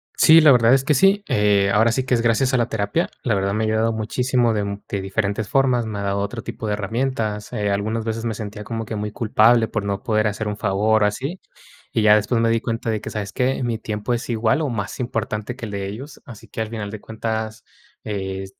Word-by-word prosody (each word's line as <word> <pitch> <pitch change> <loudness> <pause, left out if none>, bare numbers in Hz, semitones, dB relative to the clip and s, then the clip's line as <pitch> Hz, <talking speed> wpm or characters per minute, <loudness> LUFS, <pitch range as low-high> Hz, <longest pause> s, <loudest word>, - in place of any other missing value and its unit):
Sí, 160 0 +7
la 150 -2 +7
verdad 120 -1 +5
es 135 0 +3
que 150 +2 +2
sí. 195 +8 +4
Eh, 100 -1 +3
ahora 110 +3 +4
sí 130 +3 0
que 130 - 0
es 120 - +3
gracias 120 +3 +2
a - - +4
la 120 - 0
terapia. 105 +10 -1
La 115 - +1
verdad, 100 0 0
me 110 +1 0
ha - - +1
ayudado 110 +1 +1
muchísimo 120 +2 0
de 105 -1 0 0.2
de 100 - -3
diferentes 100 +1 -2
formas, 130 -3 +2
me 105 -2 -4
ha - - -3
dado 100 0 -1
otro 105 +3 -4
tipo 110 - -6
de 105 - 0
herramientas. 110 0 -2
Eh, 105 -4 -1
algunas 110 +3 -1
veces 115 0 -3
me 115 -1 -1
sentía 105 -1 -6
como 115 +1 -4
que 110 - -5
muy 105 0 -3
culpable 115 +1 +3
por 110 - -3
no 100 -1 -3
poder 110 -1 +1
hacer 105 +1 -3
un 105 - -2
favor 105 +2 +2
o - - +5
así. 135 - -4 0.5
Y 110 - +1
ya 105 0 +7
después 105 +3 +1
me 115 - +2
di 115 0 +2
cuenta 115 -1 -3
de 110 -1 -1
que, - - -7
¿sabes 100 -2 -4
qué?, 130 +1 0
mi 120 -2 -1
tiempo 110 +2 -3
es 120 - -4
igual 115 +5 +1
o 150 - -1
más 105 -4 -4
importante 115 -1 -3
que 120 - -6
el - - -7
de 100 -1 -3
ellos. 130 +8 -8
Así 115 -1 -12
que, - - -6
al 110 - -4
final 105 -3 -5
de 110 0 -7
cuentas, 110 0 -4 0.4
eh, 95 -2 -4
110 Hz, 250 wpm, -22 LUFS, 105-120 Hz, 0.5 s, Sí